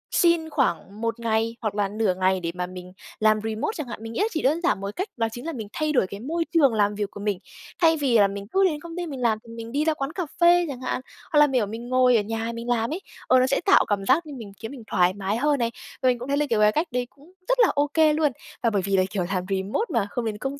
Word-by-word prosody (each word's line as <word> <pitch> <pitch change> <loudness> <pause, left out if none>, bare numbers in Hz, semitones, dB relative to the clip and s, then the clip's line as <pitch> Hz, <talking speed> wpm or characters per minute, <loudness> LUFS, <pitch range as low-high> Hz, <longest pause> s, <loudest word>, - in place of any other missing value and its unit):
xin 335 -2 +3
khoảng 235 -7 -1
1 230 0 -2
ngày 225 0 0
hoặc 215 -3 -2
là 205 -2 0
nửa 210 -3 +1
ngày 185 0 +2
để 170 -1 -3
mà 180 0 -2
mình 180 0 -10 0.3
làm 215 0 +4
remote 220 - -2
chẳng 305 -6 -5
hạn, 235 - -7
mình 225 - -6
nghĩ - - -3
là 430 - +3
chỉ 315 - -2
đơn 310 +6 +2
giản 335 - +1
1 200 +1 -5
cách 375 - -2
đó 225 -1 +1
chính 240 +5 -8
là 330 - -3
mình 220 -5 -6
thay 310 -1 -1
đổi 245 - +3
cái 200 - -8
môi 325 +8 -2
trường 280 -8 +5
làm 205 -1 +2
việc 205 -1 -3
của - - -9
mình. 205 -2 -1 0.4
Thay 325 -1 +5
vì 265 -6 +2
là 200 -1 +6
mình 200 0 -7
cứ 390 - +4
đến 305 -5 0
công 335 0 -9
ty 350 - -2
mình 270 -5 -6
làm 225 -3 +2
thì 230 -1 -12
mình 230 0 -8
đi 295 +3 0
ra 320 - +3
quán 275 0 -4
cà 365 - -2 0.2
phê 345 0 +6
chẳng 260 -2 -6
hạn, 255 - -2 0.3
hoặc 295 - +4
là 295 - +7
mỉa 255 -6 +1
mình 230 +4 -7
ngồi 255 -1 +4
ở - - +2
nhà 225 +2 -3
mình 235 +1 -6
làm 230 0 +1
ấy, 375 - -4 0.3
ờ, 255 0 +5
nó 255 - +3
sẽ 275 - +1
tạo 390 - +5
cảm 200 -2 -1
giác 335 +9 +3
như 295 - -8
mình 205 -4 -9
khiến 225 - -6
mình 250 -5 -9
thoải 180 0 +3
mái 200 +2 -2
hơn 290 +1 +1
này, 235 0 0 0.3
và 255 - +5
mình 245 - +1
cũng 250 +3 -7
thấy 280 - +1
là, 295 - +2
kiểu, 225 -2 +2
cái 210 0 +6
cách 315 +6 0
đấy 245 0 -1
cũng 290 +6 -21 0.2
rất - - +2
là 465 - +7
ô 290 0 +2
kê 315 -2 +5
luôn. 300 -2 +2 0.3
Và 230 - +4
bởi 205 -3 0
vì 195 +1 0
là 185 - +4
kiểu 190 -4 -1
làm 180 - -1
remote 195 - -1
mà 220 -4 +1
không 245 - -2
đến 215 -2 -2
công 275 +4 -4
235 Hz, 305 wpm, -24 LUFS, 210-295 Hz, 0.4 s, là